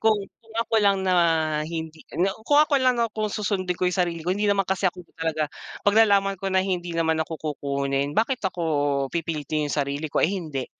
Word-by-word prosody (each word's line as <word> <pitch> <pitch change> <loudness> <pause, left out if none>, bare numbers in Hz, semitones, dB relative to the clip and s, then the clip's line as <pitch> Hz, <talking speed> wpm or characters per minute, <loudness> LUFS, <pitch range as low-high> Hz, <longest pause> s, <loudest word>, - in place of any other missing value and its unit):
kung 220 -1 +4 0.3
kung 225 0 -18
ako 230 -1 -1
lang 200 -1 +3
na 185 - +3 0.5
hindi 160 -1 -6 0.2
na 190 +2 +2
kung 290 +5 +3
ako 300 -1 +4
lang, 250 -2 +3
'no, 230 - +3
kung 215 -1 -1
susundin 190 -4 -1
ko 185 - 0
'yong 180 - 0
sarili 170 -2 -1
ko, 180 - +2
hindi 205 0 0
naman 195 -1 +2
kasi 190 0 +1
ako 180 -1 -12
talaga. 155 -2 -1 0.4
Pag 205 - +4
nalaman 195 -2 +3
ko 195 - -2
na 190 0 +2
hindi 175 -2 -2
naman 160 -1 +1
ako 155 -2 -5
kukunin, 140 0 -1
bakit 240 +3 +1
ako, 180 -2 -2 0.5
pipilitin 155 -2 -2
'yong 150 - -1
sarili 140 +2 -1
ko, - - 0
ay 170 - +2
hindi. 155 -8 -4
180 Hz, 210 wpm, -24 LUFS, 160-200 Hz, 0.5 s, kung